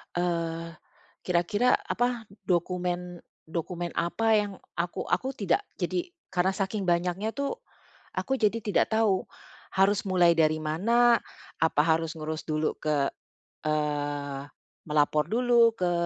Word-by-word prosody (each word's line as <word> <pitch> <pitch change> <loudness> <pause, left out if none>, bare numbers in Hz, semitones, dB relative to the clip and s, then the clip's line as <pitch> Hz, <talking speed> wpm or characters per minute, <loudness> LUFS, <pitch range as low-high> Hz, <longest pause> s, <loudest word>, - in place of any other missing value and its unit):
Eee, 170 -1 -1 0.6
kira-kira, 205 +8 +2
apa, 245 -2 -1 0.2
dokumen-dokumen 175 -1 -3
apa 225 +6 0
yang 205 -1 0 0.3
aku 170 +1 -2
aku 265 +1 +1
tidak 265 - 0 0.2
jadi 355 0 -2 0.2
karena 185 +1 +2
saking 195 +1 -2
banyaknya 180 +5 0
tuh 280 +10 -2 0.6
aku 265 - -1
jadi 220 0 +2
tidak 210 +1 +1
tahu 220 -4 +3 0.5
harus 195 +1 +3
mulai 175 -3 +4
dari 155 -1 +3
mana, 230 +10 +4 0.4
apa 160 -2 +3
harus 165 +1 +1
ngurus 155 0 -5
dulu 155 0 -1
ke, 145 -3 +1 0.6
eee, 145 -2 -1 0.5
melapor 150 0 +2
dulu 235 -1 +4
ke 180 -3 +1
180 Hz, 115 wpm, -28 LUFS, 160-220 Hz, 0.6 s, mulai